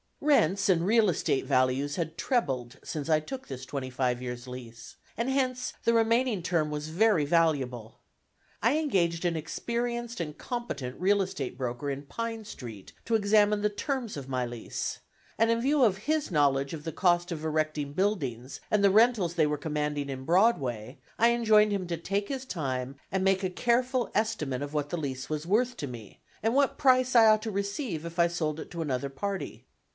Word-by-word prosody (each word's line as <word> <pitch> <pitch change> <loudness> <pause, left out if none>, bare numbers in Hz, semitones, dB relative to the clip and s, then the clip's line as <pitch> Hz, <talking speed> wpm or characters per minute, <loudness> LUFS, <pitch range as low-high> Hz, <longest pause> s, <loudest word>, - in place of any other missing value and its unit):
Rents 200 - +3
and 170 -2 +3
real 220 0 +4
estate 140 -4 0
values 135 +2 +1
had 165 -1 -3
trebled 135 - -1
since 155 0 -5
I 155 -1 +4
took 260 +12 -7
this 130 -1 -7
twenty 135 -1 -4
five 125 -1 0
years' 125 0 -6
lease, 120 -2 -9 0.2
and 235 +4 -1
hence 255 -2 0
the 230 - +3
remaining 230 -2 +2
term 165 -3 0
was 150 +1 -4
very 180 -2 +3
valuable. 140 -8 0 0.6
I 240 +7 +4
engaged 180 - +1
an 170 -1 +1
experienced 235 +8 -3
and 150 -3 -4
competent 145 - -5
real 200 +2 +3
estate 180 -10 -4
broker 125 +2 -3
in 140 0 -4
Pine 225 +8 -5
Street 115 - -9
to 230 - +1
examine 210 0 +3
the 210 - +2
terms 250 +2 -3
of 135 -2 -7
my 130 -1 0
lease, 120 -1 -5 0.4
and 225 +1 +3
in 230 0 +1
view 280 +2 +3
of 200 -5 +3
his 300 +4 -1
knowledge 140 -2 +2
of 155 -2 -6
the 165 - -4
cost 175 +1 +2
of 160 -2 -4
erecting 155 -2 -1
buildings 145 - -2
and 210 -1 +3
the 200 - +6
rentals 215 -5 +4
they 155 -3 +3
were 150 0 -1
commanding 150 -1 -2
in 130 -1 -5
Broadway, 135 - +1 0.2
I 230 +1 +6
enjoined 215 -3 +4
him 195 -2 -1
to 170 -1 -2
take 200 +5 -2
his 265 -1 -4
time, 135 - -3 0.2
and 190 0 0
make 195 0 +2
a 185 - +1
careful 245 +4 +1
estimate 160 - -1
of 145 +1 -5
what 145 -1 -1
the 175 - -2
lease 135 -4 -4
was 155 0 -3
worth 240 +5 +1
to 145 - -4
me, 115 -5 -10 0.2
and 225 +3 +1
what 280 -1 +2
price 255 -3 +4
I 230 -1 +8
ought 215 -1 +5
to 225 - -3
receive 200 - -3
if 170 +1 -7
I 170 0 +5
sold 160 -3 -2
it - - -8
to 170 -2 -4
another 140 -3 -2
party. 185 +3 -5
170 Hz, 190 wpm, -28 LUFS, 140-225 Hz, 0.6 s, I